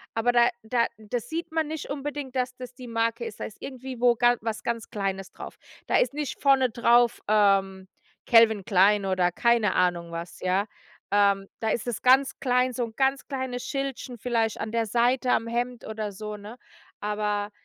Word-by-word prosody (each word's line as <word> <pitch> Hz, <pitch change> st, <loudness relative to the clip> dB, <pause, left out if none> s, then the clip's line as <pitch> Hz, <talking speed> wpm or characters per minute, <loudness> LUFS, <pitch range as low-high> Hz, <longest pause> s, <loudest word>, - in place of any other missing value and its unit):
aber 225 Hz, +2 st, +2 dB
da 240 Hz, 0 st, +5 dB
da 235 Hz, +1 st, +1 dB
das 220 Hz, +2 st, -5 dB
sieht 330 Hz, +1 st, -4 dB
man 320 Hz, -1 st, 0 dB
nicht 315 Hz, -1 st, -6 dB
unbedingt, 285 Hz, -1 st, -5 dB
dass 255 Hz, 0 st, -1 dB
das 250 Hz, -1 st, -9 dB
die 250 Hz, 0 st, -10 dB
Marke 230 Hz, -, -1 dB
ist, 455 Hz, -, -8 dB
da -, -, -2 dB
ist -, -, -10 dB
irgendwie 260 Hz, -1 st, -7 dB
wo 245 Hz, -1 st, +5 dB, 0.3 s
was 220 Hz, 0 st, -4 dB
ganz 230 Hz, -1 st, -3 dB
Kleines 195 Hz, -3 st, -3 dB
drauf. -, -, -9 dB, 0.3 s
Da -, -, +3 dB
ist -, -, +1 dB
nicht 295 Hz, -1 st, -4 dB
vorne 270 Hz, -2 st, +4 dB
drauf, 235 Hz, +1 st, +3 dB
ähm, 195 Hz, -2 st, +2 dB, 0.4 s
“Calvin 225 Hz, -3 st, +5 dB
Klein“ 200 Hz, 0 st, +4 dB
oder 185 Hz, -2 st, +1 dB
keine 235 Hz, -2 st, +2 dB
Ahnung 175 Hz, -2 st, +1 dB
was, 170 Hz, +1 st, -7 dB
ja. 185 Hz, +2 st, +1 dB, 0.5 s
Ähm, 200 Hz, -1 st, +3 dB
da 220 Hz, -, 0 dB
ist 235 Hz, -, -2 dB
es 240 Hz, -, -3 dB
ganz 265 Hz, +2 st, +4 dB
klein, 250 Hz, 0 st, +2 dB
so 245 Hz, -1 st, -1 dB
'n 225 Hz, -, -11 dB
ganz 270 Hz, 0 st, 0 dB
kleines 260 Hz, -3 st, -4 dB
Schildchen 275 Hz, -3 st, -4 dB
vielleicht 225 Hz, -1 st, -1 dB
an 215 Hz, -, -4 dB
der 230 Hz, 0 st, 0 dB
Seite 245 Hz, +3 st, +1 dB
am 225 Hz, -, +1 dB
Hemd 240 Hz, 0 st, -3 dB
oder 215 Hz, -2 st, -5 dB
so, 210 Hz, +2 st, -6 dB
ne? 210 Hz, +4 st, -10 dB, 0.4 s
Aber 210 Hz, 0 st, -2 dB
235 Hz, 185 wpm, -26 LUFS, 210-255 Hz, 0.5 s, da